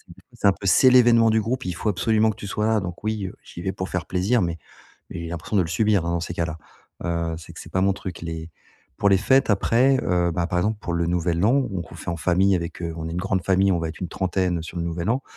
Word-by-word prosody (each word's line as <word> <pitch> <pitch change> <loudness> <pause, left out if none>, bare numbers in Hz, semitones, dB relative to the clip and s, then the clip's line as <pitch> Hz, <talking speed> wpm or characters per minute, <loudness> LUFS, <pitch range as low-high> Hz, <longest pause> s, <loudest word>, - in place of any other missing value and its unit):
du 95 - -19
coup, - - -55
c'est 110 -4 +1
un - - +7
peu: 100 - -11
«C'est 130 +7 +6
l'événement 120 -2 +6
du 110 0 +3
groupe, 120 +1 -3
il 90 - -2
faut 105 - -1
absolument 110 +3 +2
que 105 - -4
tu 100 - -7
sois 105 +2 -1
là», 110 -1 +3
donc 90 0 -7
oui, 110 -2 -2
heu, - - -8
j'y 85 - -10
vais 95 0 -2
pour 95 0 -5
faire 90 -1 -3
plaisir 100 +6 +1
mais 85 -1 -1 0.5
mais - - -6
j'ai - - -5
l'impression 85 +4 -3
de 95 - +5
le 80 - -2
subir, 100 +1 +1
hein, 85 - -1
dans 85 - 0
ces 85 - -4
cas-là. 85 -2 -3 0.5
Heu, 85 -1 -1
c'est 80 - -11
que - - -11
c'est - - -11
pas 95 - +1
mon 100 0 +3
truc 95 -2 -7
les 80 0 -6 0.5
pour 100 - +3
les 95 - +5
fêtes 130 +5 +3
après, 125 +6 +3
heu, 90 -1 +1
bah, 85 +1 -1
par 90 -1 0
exemple, 105 +3 0
pour 85 - -4
le 85 0 0
nouvel 85 0 0
an, 135 +6 +4
donc 85 -4 -5
on - - -9
fait 85 - -6
en 85 - -4
famille 95 +3 +3
avec, 85 0 -4
heu 85 -1 -3
on 80 - -4
est - - -5
une 85 - -4
grande 95 -1 -1
famille, 95 +1 +3
on 85 - +1
va 80 - -2
être 80 - -9
une 90 - -3
trentaine 90 -2 -1
sur 85 +2 -8
le 85 - -1
nouvel 85 +3 -3
an. 125 +4 +1
90 Hz, 295 wpm, -23 LUFS, 85-105 Hz, 0.5 s, un